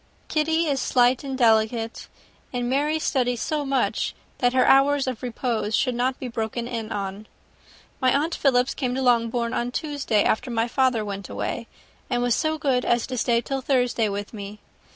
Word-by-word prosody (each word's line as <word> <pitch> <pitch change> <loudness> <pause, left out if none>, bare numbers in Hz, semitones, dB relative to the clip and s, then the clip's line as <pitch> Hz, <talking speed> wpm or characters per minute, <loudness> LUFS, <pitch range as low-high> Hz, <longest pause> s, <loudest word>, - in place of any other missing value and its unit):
Kitty 320 +2 +1
is 280 -4 0
slight 250 +1 +3
and 270 -1 -4
delicate, 225 -1 +2 0.4
and 245 -1 -2
Mary 290 +5 +1
studies 250 -6 0
so 300 -1 -1
much 275 -1 0 0.2
that 245 -1 +3
her 255 -1 +4
hours 275 +1 +4
of 255 -4 -4
repose 235 -3 -2
should 255 - +1
not 255 +2 -1
be 260 - -4
broken 230 0 -3
in 230 -3 -4
on. 200 +1 -4 0.7
My 255 -1 +4
aunt 305 +5 +1
Philips 255 -2 +2
came 250 -3 -2
to 265 - -1
Longbourn 235 -1 +2
on 240 - -1
Tuesday, 275 -6 0
after 220 - 0
my 230 -1 0
father 250 -3 +1
went 200 -1 -6
away; - - -4 0.4
and 245 -1 0
was 245 -1 +2
so 315 +4 0
good 265 -5 +1
as 240 -1 +1
to 255 - -5
stay 235 -1 +2
till 270 +2 -3
Thursday 245 -4 +1
with 205 +2 -5
me. 205 -1 -7
245 Hz, 180 wpm, -24 LUFS, 230-270 Hz, 0.7 s, her